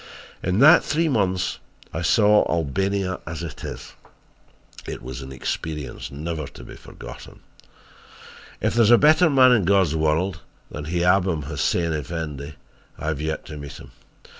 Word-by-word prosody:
"In 90 Hz, +2 st, -1 dB
that 140 Hz, +6 st, +7 dB
three 160 Hz, +3 st, 0 dB
months 95 Hz, -7 st, 0 dB, 0.3 s
I -, -, -3 dB
saw 105 Hz, -1 st, +4 dB
Albania 95 Hz, +4 st, -1 dB
as 80 Hz, +1 st, -5 dB
it 85 Hz, -, -8 dB
is -, -, -7 dB, 0.9 s
it -, -, -6 dB
was 65 Hz, +2 st, -7 dB
an 65 Hz, 0 st, -9 dB
experience 70 Hz, +1 st, -5 dB
never 75 Hz, +1 st, -5 dB
to -, -, -12 dB
be -, -, -11 dB
forgotten! -, -, -12 dB, 1.2 s
"If -, -, +1 dB
there 120 Hz, -, +3 dB
is -, -, +3 dB
a 120 Hz, -, +8 dB
better 155 Hz, +5 st, +5 dB
man 130 Hz, -3 st, +6 dB
in 115 Hz, -5 st, +4 dB
God's 95 Hz, -4 st, +3 dB
world 80 Hz, +3 st, 0 dB, 0.3 s
than 75 Hz, -, -6 dB
Hiabam 90 Hz, 0 st, +1 dB
Hussein 80 Hz, +3 st, -1 dB
Effendi, 75 Hz, -1 st, -5 dB, 0.4 s
I 80 Hz, -, -3 dB
have 75 Hz, -2 st, -3 dB
yet 80 Hz, 0 st, -3 dB
to 75 Hz, -, -8 dB
meet 70 Hz, -1 st, -8 dB
him. -, -, -12 dB
85 Hz, 155 wpm, -23 LUFS, 75-100 Hz, 1.2 s, a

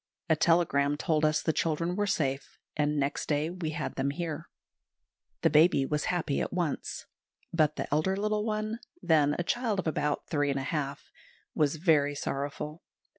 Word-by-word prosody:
A -, -, +6 dB
telegram 150 Hz, -3 st, +3 dB
told 155 Hz, -1 st, +1 dB
us 155 Hz, 0 st, +2 dB
the 160 Hz, -, +1 dB
children 170 Hz, +3 st, 0 dB
were 205 Hz, +1 st, 0 dB
safe, 140 Hz, -8 st, -1 dB, 0.2 s
and 150 Hz, 0 st, +1 dB
next 140 Hz, +1 st, -1 dB
day 150 Hz, +2 st, +1 dB
we 175 Hz, -3 st, -4 dB
had 155 Hz, -1 st, -4 dB
them 135 Hz, +1 st, +1 dB
here. 160 Hz, +1 st, -4 dB, 0.9 s
The -, -, +4 dB
baby 155 Hz, -3 st, +5 dB
was 150 Hz, +2 st, -1 dB
happy 165 Hz, -5 st, 0 dB
at -, -, -2 dB
once; 175 Hz, -5 st, -2 dB, 0.5 s
but 155 Hz, -2 st, +3 dB
the -, -, -2 dB
elder 190 Hz, +6 st, +1 dB
little 210 Hz, +1 st, 0 dB
one, 215 Hz, +1 st, -2 dB, 0.2 s
then 150 Hz, -3 st, +4 dB
a 175 Hz, -, 0 dB
child 230 Hz, +2 st, 0 dB
of 190 Hz, -, -2 dB
about 150 Hz, -2 st, -1 dB
three 145 Hz, -3 st, +1 dB
and 140 Hz, -, 0 dB
a -, -, -3 dB
half, 140 Hz, -1 st, -3 dB, 0.4 s
was 150 Hz, 0 st, +2 dB
very 150 Hz, -3 st, +3 dB
sorrowful. 145 Hz, +3 st, -4 dB
155 Hz, 175 wpm, -29 LUFS, 145-175 Hz, 0.9 s, A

